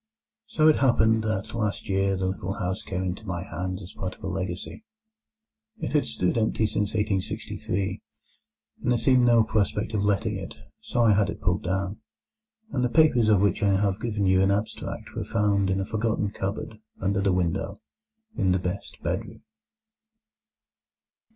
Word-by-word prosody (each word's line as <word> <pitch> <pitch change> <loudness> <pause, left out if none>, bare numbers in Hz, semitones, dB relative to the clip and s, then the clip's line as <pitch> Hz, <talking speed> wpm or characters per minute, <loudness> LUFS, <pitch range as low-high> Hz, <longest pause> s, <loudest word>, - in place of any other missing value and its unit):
It - - -19
so 155 -1 +6
happened 110 -5 +3
that 110 -3 -2
last 105 -3 -2
year 95 0 +1
the 95 - -1
little 95 0 -2
house 95 +1 -3
came 95 -3 -3
into 95 +3 -3
my 90 -4 -4
hands 95 +2 -4
as 90 - -10
part 95 -1 -5
of - - -21
a - - -3
legacy. 95 - -4 0.9
It - - -4
had 150 - +2
stood 90 +9 0
empty 110 0 +1
since 105 0 -1
1863, 100 -2 -2 0.8
and - - +1
there 120 - +3
seemed 130 +1 +4
no 115 -1 +6
prospect 105 0 0
of 105 - +1
letting 105 +1 +1
it; 95 -2 -7 0.2
so 120 - 0
I 110 -2 +6
had 100 0 +2
it - - -5
pulled 90 +3 0
down, 95 +2 -2 0.7
and 125 - 0
the 125 - +2
papers 125 -7 +4
of 105 -3 +5
which 100 -3 +2
I 100 -2 +3
have 100 0 0
given 105 -4 -1
you 95 0 +4
an 95 - +3
abstract 105 +3 -3
were - - -2
found 100 -2 +1
in 95 0 +1
a 95 - -1
forgotten 110 -1 -1
cupboard 105 +3 -4 0.2
under 100 +1 0
the 100 -1 +2
window 90 +2 -1 0.6
in 95 - +2
the - - +3
best 90 +2 -4
bedroom. 95 +6 -3
100 Hz, 175 wpm, -26 LUFS, 95-110 Hz, 0.9 s, so